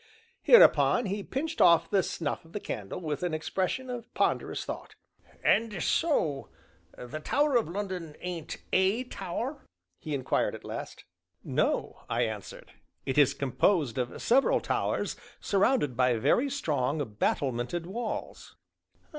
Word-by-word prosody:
Hereupon 470 - +6
he 200 +1 -2
pinched 295 +9 -3
off 170 0 +6
the 195 - +4
snuff 160 -4 -3
of 165 - -19
the 210 - -3
candle 105 - -5
with 155 -2 -3
an 175 -3 -1
expression 190 +10 -2
of 240 -2 -7
ponderous - - 0
thought. - - -7 0.5
"And 215 -6 +2
so 165 - +1 0.5
the 125 +5 -6
Tower 285 - +1
o' - - +2
London 180 -4 -5
ain't 175 -3 -5 0.2
a 190 +6 +3
tower?" 250 - -5 0.4
he 155 -2 -4
inquired 130 -2 0
at - - -11
last. - - -7 0.4
"No," - - -1
I - - +1
answered; - - -6 0.3
"it 135 +2 +1
is 145 - +5
composed 140 - +1
of 125 -1 -3
several 265 +4 +3
towers - - -1 0.2
surrounded 195 - +2
by 125 0 +3
very 245 - +2
strong, 150 - -1 0.2
battlemented 135 +6 -1
walls." 220 +5 -5
175 Hz, 135 wpm, -29 LUFS, 145-230 Hz, 0.5 s, Hereupon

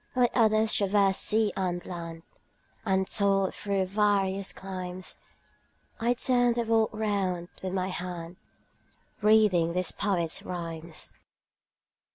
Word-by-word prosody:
Let 250 -1 +3
others 220 -2 +3
traverse 200 -1 +3
sea 215 -1 +2
and 180 -2 -2
land, 165 -2 -7 0.6
And 190 0 +2
toil 195 -2 +2
through 200 -2 -1
various 195 -1 +1
climes, 185 -1 -6 0.8
30 235 - 0
I - - +5
turn 245 -1 +3
the 235 0 -1
world 225 -1 +2
round 195 -5 -2
with 185 -1 -4
my 185 0 -1
hand 175 -1 -6 0.8
Reading 205 -6 +4
these 180 -1 0
poets' 175 -5 -1
rhymes. 165 -2 -6
190 Hz, 120 wpm, -28 LUFS, 180-215 Hz, 0.8 s, I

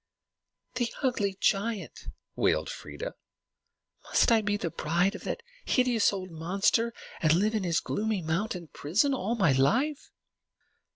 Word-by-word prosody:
"The 240 -2 -1
ugly 205 -7 0
giant!" 205 +1 -1 0.3
wailed - - +1
Freia. - - -7 0.9
"Must - - +3
I 225 -1 +5
be 205 0 0
the 170 -5 -3
bride 175 +6 +1
of 205 - -9
that 470 - -3 0.2
hideous 250 -4 +3
old 185 -2 -5
monster, 195 +8 +1 0.3
and 155 -1 +4
live 210 +5 +2
in 215 -3 0
his 170 -2 +1
gloomy 215 -3 -2
mountain 170 +2 -2
prison 210 - +1
all 230 -2 -1
my 190 -10 +3
life?" 245 - +1
205 Hz, 135 wpm, -29 LUFS, 175-230 Hz, 0.9 s, I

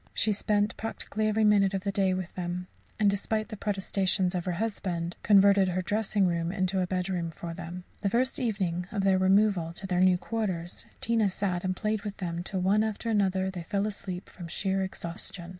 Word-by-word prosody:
She 215 - +3
spent 210 +1 +1
practically 215 -1 -2
every 215 +1 +2
minute 200 -2 +4
of 190 - -2
the 200 - 0
day 190 -2 +2
with 185 -1 -5
them; 180 0 -3 0.3
and, 210 - +4
despite 215 +2 0
the 215 - -5
protestations 195 -2 0
of 180 -2 -2
her 180 - -1
husband, 175 -4 -2
converted 200 -1 +6
her 185 0 -1
dressing 205 +1 +1
room 170 -1 0
into 185 0 0
a 180 - 0
bedroom 180 -2 -1
for 165 +1 -7
them. 175 +1 -7 0.2
The 200 - +1
first 255 +7 +1
evening 190 -8 -1
of 200 -3 -1
their 190 -1 +4
removal 190 -3 +3
to 190 - -8
their 180 -1 +1
new 185 -1 +5
quarters, 185 -5 -3
Tina 225 -3 +2
sat 185 -2 -2
and 185 0 0
played 215 +2 -1
with 205 -1 -6
them 170 -2 -3
till 185 +1 -3
one 200 +4 +3
after 220 +1 -2
another 190 -2 +1
they 180 -2 -6
fell 200 +4 -1
asleep 190 -3 -4
from 175 -2 -9
sheer 190 +3 -1
exhaustion. 175 -1 -6
190 Hz, 200 wpm, -29 LUFS, 180-205 Hz, 0.3 s, converted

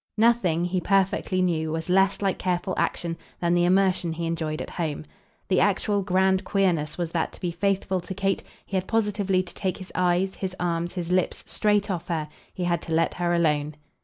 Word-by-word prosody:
Nothing, 210 -7 +3
he 180 0 -1
perfectly 190 0 +1
knew, 160 -3 0
was 160 0 -3
less 195 +2 +3
like 195 -1 0
careful 180 0 -1
action 170 -1 -1 0.2
than 170 0 +1
the 175 0 +3
immersion 185 -2 +3
he 165 +1 -3
enjoyed 160 -1 -2
at - - -6
home. 155 -3 -3 0.4
The 185 - +3
actual 205 +1 +2
grand 190 0 +2
queerness 180 -7 +1
was 170 -2 -2
that 165 -1 -1
to - - -12
be 175 -2 -2
faithful 190 +1 0
to 190 +2 -7
Kate 195 0 0 0.2
he 195 - -5
had 185 0 0
positively 205 -4 +1
to 180 - -11
take 185 -2 -2
his 185 - -10
eyes, 180 +1 +1
his 185 -1 -4
arms, 170 -1 -1
his 175 -1 -3
lips 185 -1 +1
straight 210 -1 +1
off 175 -3 -4
her 155 -3 -2 0.2
he 185 - -5
had 175 -2 +1
to 165 - -2
let 165 - +2
her 175 -1 -1
alone. 150 -3 +1
180 Hz, 200 wpm, -25 LUFS, 170-195 Hz, 0.4 s, Nothing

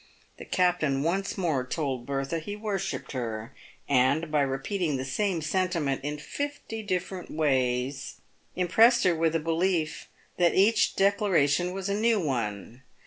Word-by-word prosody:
The - - -8
captain 165 -7 +1
once 190 +5 -1
more 160 -9 0
told 130 -3 -3
Bertha 135 +4 -2
he 205 +6 -6
worshipped 210 -3 -3
her, 115 -1 -4 0.3
and, 140 +4 +2
by 150 -1 +3
repeating 140 +4 -1
the 130 - -4
same 175 +4 -1
sentiment 160 -5 0
in 145 +1 -3
fifty 285 - -5
different 185 -2 -3
ways, 135 -2 0 0.4
im 180 0 0
pressed 235 +6 +5
her 180 - +4
with 165 0 +1
a - - +3
belief 165 0 -1 0.3
that 175 -1 +3
each 210 +3 +4
declaration 180 -5 +2
was 190 +1 -4
a 200 - 0
new 220 +1 +2
one. 120 - -3
165 Hz, 145 wpm, -27 LUFS, 135-190 Hz, 0.4 s, pressed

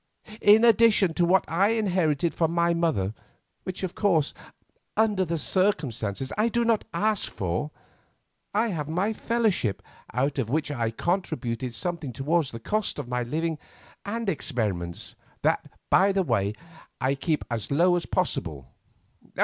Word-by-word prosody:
In 215 +3 +7
addition 220 -5 +5
to 175 - +2
what 185 +2 +3
I 195 +6 +2
inherited 175 -7 +1
from 165 -1 0
my 170 0 +2
mother, 155 - 0 0.5
which, 185 +1 -5
of 185 - -2
course, 170 -8 +2 0.6
under 210 -3 +3
the 170 -1 -2
circumstances 135 - 0
I 225 +2 +3
do 235 +1 +1
not 230 -2 +2
ask 215 -1 0
for, 95 - -2 0.8
I 220 +3 +1
have 155 -6 -3
my 190 +7 0
fellowship, 215 - 0 0.3
out 135 +4 0
of 115 -4 -1
which 150 +2 0
I 120 -5 -1
contribute 130 - -2
something 170 -5 -3
towards 150 +4 +1
the 115 - -7
cost 215 - -1
of 145 -4 -5
my 125 0 -1
living 155 +5 -2 0.4
and 225 +3 -3
experiments, 110 - -2 0.3
that, - - +1 0.2
by 195 +2 +5
the 195 -1 +1
way, 105 - 0 0.4
I 130 +1 +1
keep 150 +2 -1
as 115 -3 -2
low 175 +5 +4
as 175 - -2
possible." 80 - -2
165 Hz, 150 wpm, -26 LUFS, 130-195 Hz, 0.8 s, In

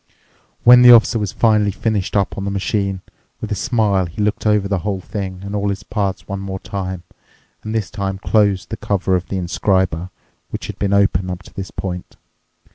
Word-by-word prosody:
When 125 +1 +8
the 125 0 +9
Officer 115 -1 +6
was 105 -3 -2
finally 105 -3 +3
finished 105 0 -2
up 100 - 0
on 100 - -4
the 100 - -2
machine, 100 -1 -1 0.4
with - - -6
a - - +1
smile 105 -6 +1
he 85 - -11
looked 105 +1 0
over 105 -2 +3
the 100 -2 0
whole 95 +1 -2
thing 95 -1 -6
and 100 +1 -5
all 100 0 0
its 100 0 -3
parts 100 -3 -3
one 100 0 -4
more 95 -1 -5
time, 95 -3 -5 0.6
and 110 +1 -5
this 110 -3 -2
time 95 -2 -3
closed 100 -1 +1
the 110 - -3
cover 95 -2 0
of 90 0 -2
the 95 - -3
inscriber, 90 -1 0 0.4
which - - -5
had - - -7
been 100 -1 0
open 95 -2 +2
up 90 +1 -5
to - - -16
this 95 -1 -6
point. 90 -2 -6
100 Hz, 200 wpm, -19 LUFS, 95-105 Hz, 0.6 s, the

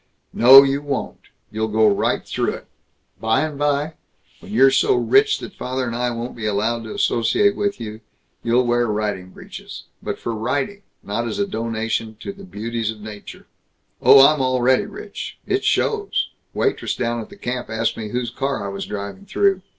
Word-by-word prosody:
"No. 135 +3 +9
You 140 +1 0
won't. 145 -2 -4 0.2
You'll 110 +1 -1
go 110 0 +3
right 100 - +1
through - - -1
it. - - -11 0.5
By 110 0 +2
and 155 -1 -2
by, 145 +1 0 0.5
when - - -12
you're 135 +4 +5
so 410 - +3
rich 420 +3 +3
that - - -9
father 130 +1 -3
and 115 -1 -3
I 125 +1 0
won't 120 +1 -5
be 110 -2 -4
allowed 110 +3 -1
to 110 - -7
associate 120 - +2
with 205 -7 -1
you, 110 -1 -7 0.4
you'll 120 +2 +2
wear 120 0 +2
riding 105 -3 -2
breeches - - -10 0.2
but - - -4
for 120 - -4
riding, 140 - -2 0.2
not 115 +4 -2
as - - -4
a 200 - +1
donation 115 - -3
to 200 - -5
the 200 0 -13
beauties 115 - -4
of 110 -1 -5
nature." 105 -1 -10 0.6
"Oh, 135 0 +9
I'm 150 -1 +4
already 130 0 +2
rich. 410 +2 -8
It 390 +1 0
shows. 425 -2 0 0.2
Waitress 415 - 0
down 120 -1 -1
at 110 - -10
the - - -12
camp 125 -1 -4
asked 110 +1 -1
me 110 -2 -6
whose 120 0 -2
car 135 -4 -2
I - - -3
was 100 0 -5
driving 100 - -6
through." 195 -1 +2
120 Hz, 185 wpm, -21 LUFS, 110-145 Hz, 0.6 s, No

